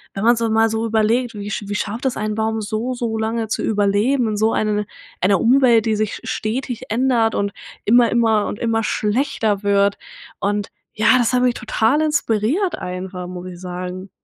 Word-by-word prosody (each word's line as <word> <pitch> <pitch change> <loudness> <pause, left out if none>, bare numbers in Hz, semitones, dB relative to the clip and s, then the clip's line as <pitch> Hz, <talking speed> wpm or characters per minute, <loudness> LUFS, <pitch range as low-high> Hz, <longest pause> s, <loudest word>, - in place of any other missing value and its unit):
wenn 195 - -3
man 235 +2 +5
so 230 -1 -1
mal 225 +1 +3
so 225 +1 -1
überlegt, 225 +2 +1
wie 205 0 -6
sch 210 - -4
wie 205 - -3
schafft 220 +5 -2
es 255 - -2
ein 215 0 -2
Baum 220 +1 -1
so, 220 +4 -3
so 235 -2 -2
lange 225 +1 -1
zu 215 - -2
überleben 215 +5 +1
in 210 - -2
so 220 +1 +2
ein 210 -1 0 0.4
einer 190 +1 +3
Umwelt, 240 -2 +4
die 220 -1 +1
sich 215 -1 -1
st - - -11
stetig 240 +2 -3
ändert 230 -1 +2
und 200 0 -1 0.3
immer 235 +2 +5
immer 225 -3 +2
und - - -4
immer 225 0 0
schlechter 215 -2 0
wird 200 0 +2 0.4
und 205 0 -1 0.2
ja, 220 +3 +4
das 240 0 +2
habe 250 0 +3
ich 245 - +1
total 225 +5 +1
inspiriert 300 - +1
einfach, 180 0 -6
muss 180 0 -7
ich 180 -1 -9
sagen. 180 +1 -6
220 Hz, 195 wpm, -20 LUFS, 205-235 Hz, 0.4 s, man